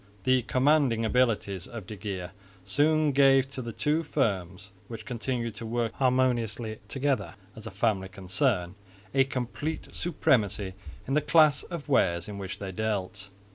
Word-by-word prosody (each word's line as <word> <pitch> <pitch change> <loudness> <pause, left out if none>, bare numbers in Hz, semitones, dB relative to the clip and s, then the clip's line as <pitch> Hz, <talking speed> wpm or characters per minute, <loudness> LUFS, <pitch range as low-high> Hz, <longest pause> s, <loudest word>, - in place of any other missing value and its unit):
The 130 +2 +3
commanding 130 -2 +2
abilities 110 -6 +1
of 115 -5 -8
de 105 - -7
Geer 95 -3 -5 0.3
soon 150 +8 +3
gave 135 -1 +5
to 130 - -5
the 115 -1 -5
two 150 +7 +1
firms, 100 - -2 0.2
which 115 -2 -8
continued 120 -1 -3
to 115 - -6
work 115 0 -1
harmoniously 120 -4 0
together 130 -9 -1 0.2
as 110 0 -9
a - - -4
family 100 -1 0
concern, 95 0 -1 0.4
a 135 -1 +4
complete 135 +4 -4
supremacy 105 - +1 0.3
in 135 - -1
the 150 - +3
class 155 -3 +5
of 170 -5 -7
wares 85 - +2
in 100 -1 -6
which 95 -1 -5
they 100 -1 -5
dealt. 100 -1 -3
115 Hz, 150 wpm, -28 LUFS, 100-135 Hz, 0.4 s, gave